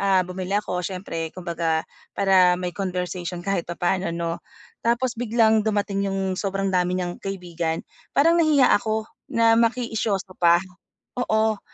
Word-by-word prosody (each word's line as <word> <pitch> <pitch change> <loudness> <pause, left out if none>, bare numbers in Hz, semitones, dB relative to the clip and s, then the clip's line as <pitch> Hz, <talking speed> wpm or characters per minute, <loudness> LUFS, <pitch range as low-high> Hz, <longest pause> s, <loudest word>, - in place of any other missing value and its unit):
Ah, 195 -2 +3
bumili 185 +2 -3
ako 205 -4 -2
siyempre 180 -3 -4
kumbaga 165 -3 -1 0.3
para 185 -2 +5
may 180 0 -4
conversation 180 -1 -4
kahit 195 -4 -1
papaano 175 +1 -1
'no, 170 0 -3 0.4
tapos 240 +2 +1
biglang 220 -2 +3
dumating 205 -2 0
'yong 195 -1 -1
sobrang 195 0 -2
dami 180 0 +1
niyang 180 -1 -4
kaibigan, 175 -4 -3 0.3
parang 335 +4 +5
nahiya 295 -5 +5
ako 220 +1 +1 0.3
na 230 0 +5
makiisyoso 225 -5 0
pa 170 -1 +6 0.6
oo. 220 -3 +1
195 Hz, 135 wpm, -24 LUFS, 180-220 Hz, 0.6 s, pa